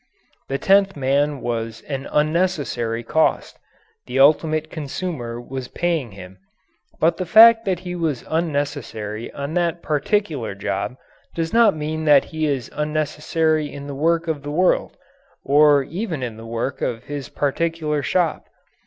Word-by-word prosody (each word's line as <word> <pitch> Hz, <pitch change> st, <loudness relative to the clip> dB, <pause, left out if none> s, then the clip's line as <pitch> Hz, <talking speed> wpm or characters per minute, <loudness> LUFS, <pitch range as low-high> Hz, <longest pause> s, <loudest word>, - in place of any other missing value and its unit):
The 135 Hz, -, -1 dB
tenth 195 Hz, +4 st, +3 dB
man 140 Hz, +1 st, +1 dB
was 115 Hz, -1 st, -3 dB
an 135 Hz, -1 st, -5 dB
unnecessary 150 Hz, -8 st, 0 dB
cost. 160 Hz, +7 st, 0 dB, 0.5 s
The -, -, -3 dB
ultimate 155 Hz, +2 st, +3 dB
consumer 140 Hz, -6 st, -5 dB
was 130 Hz, +1 st, -6 dB
paying 165 Hz, -, -2 dB
him. 95 Hz, -1 st, -12 dB, 0.6 s
But 165 Hz, +2 st, +2 dB
the 185 Hz, -, -3 dB
fact 225 Hz, +4 st, +8 dB
that 185 Hz, -3 st, -1 dB
he 180 Hz, -1 st, -5 dB
was 160 Hz, -8 st, -2 dB
unnecessary 145 Hz, -9 st, -3 dB
on 140 Hz, +2 st, -5 dB
that 170 Hz, -1 st, -1 dB
particular 150 Hz, -, -1 dB
job 105 Hz, +3 st, -3 dB, 0.4 s
does 165 Hz, -1 st, -2 dB
not 225 Hz, -7 st, +5 dB
mean 155 Hz, +1 st, -3 dB
that 145 Hz, -2 st, +6 dB
he 155 Hz, -1 st, -2 dB
is 135 Hz, -5 st, -2 dB
unnecessary 155 Hz, 0 st, 0 dB
in 140 Hz, 0 st, -8 dB
the 145 Hz, -, -6 dB
work 165 Hz, +4 st, +1 dB
of 155 Hz, -3 st, -2 dB
the 145 Hz, -, -7 dB
world, 180 Hz, +5 st, +1 dB, 0.5 s
or 145 Hz, 0 st, +5 dB
even 165 Hz, -, -4 dB
in 120 Hz, -3 st, -4 dB
the 115 Hz, +1 st, -10 dB
work 115 Hz, +3 st, -3 dB
of 115 Hz, -2 st, -2 dB
his 145 Hz, -3 st, -6 dB
particular 150 Hz, +1 st, -1 dB
shop. 170 Hz, +4 st, 0 dB
150 Hz, 145 wpm, -21 LUFS, 130-165 Hz, 0.6 s, fact